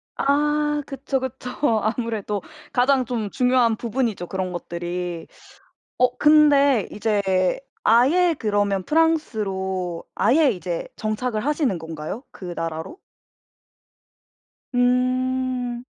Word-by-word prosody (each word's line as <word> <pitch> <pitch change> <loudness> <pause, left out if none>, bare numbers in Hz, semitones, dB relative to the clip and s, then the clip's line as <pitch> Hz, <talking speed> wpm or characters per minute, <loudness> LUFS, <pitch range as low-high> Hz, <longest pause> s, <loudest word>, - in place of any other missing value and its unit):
아. 295 +2 +2 0.3
그쵸, 275 -1 -3
그쵸. 260 -1 -6 0.3
아무래도 215 -2 -2 0.3
가장 255 0 +3
좀 225 -4 -3
중요한 250 -3 +3
부분이죠, 230 -5 -2
그런 185 -1 -3
것들이. 175 0 -5 0.7
어. 250 0 +2
근데 285 -5 +5
이제 210 -1 0 0.6
아예 310 +10 +4
그러면 205 -3 0
프랑스로 195 - 0
아예 290 +1 +4
이제 175 -4 -4
정착을 215 +1 -2
하시는 290 - +1
건가요? 160 - -6
그 180 -2 -8
나라로? 165 - -5 1.8
음. 250 0 0
240 Hz, 210 characters per minute, -23 LUFS, 190-265 Hz, 1.8 s, 근데